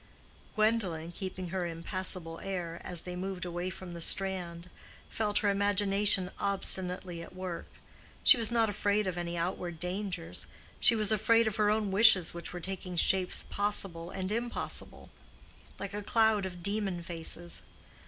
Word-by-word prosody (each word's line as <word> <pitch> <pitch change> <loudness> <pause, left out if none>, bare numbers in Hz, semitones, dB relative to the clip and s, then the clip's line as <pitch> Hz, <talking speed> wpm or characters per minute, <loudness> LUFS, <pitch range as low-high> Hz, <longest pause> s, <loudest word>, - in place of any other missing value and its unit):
Gwendolen, 200 -7 +1
keeping 185 0 -6
her 180 -1 -2
impassable 170 0 -1
air, 175 -3 -5
as 175 -2 -1
they 180 0 -6
moved 185 0 -4
away 175 +1 -3
from 185 -1 -8
the 170 - -7
strand, 180 -2 +1 0.4
felt 210 -2 -1
her - - +4
imagination 200 -1 +3
obstinately 185 -3 -1
at 170 - -11
work. 185 -2 -5 0.6
She - - +9
was 230 -2 +1
not 230 -1 +3
afraid 205 0 0
of 185 -2 -2
any 175 0 -4
outward 175 -1 -3
dangers—she 180 +4 -1
was 215 -1 +3
afraid 225 +2 +4
of 220 0 -2
her 210 -1 +3
own 210 -2 +1
wishes 195 -3 +6
which 170 0 -7
were 180 - -6
taking 185 0 -6
shapes 185 +2 +2
possible 195 -5 -1
and 185 +1 -4
impossible, 235 +2 -3 0.7
like 200 -1 -6
a 210 - -3
cloud 220 -2 +2
of 175 -2 -10
demon 200 -3 -1
faces. 170 0 -3
190 Hz, 150 wpm, -31 LUFS, 175-205 Hz, 0.7 s, She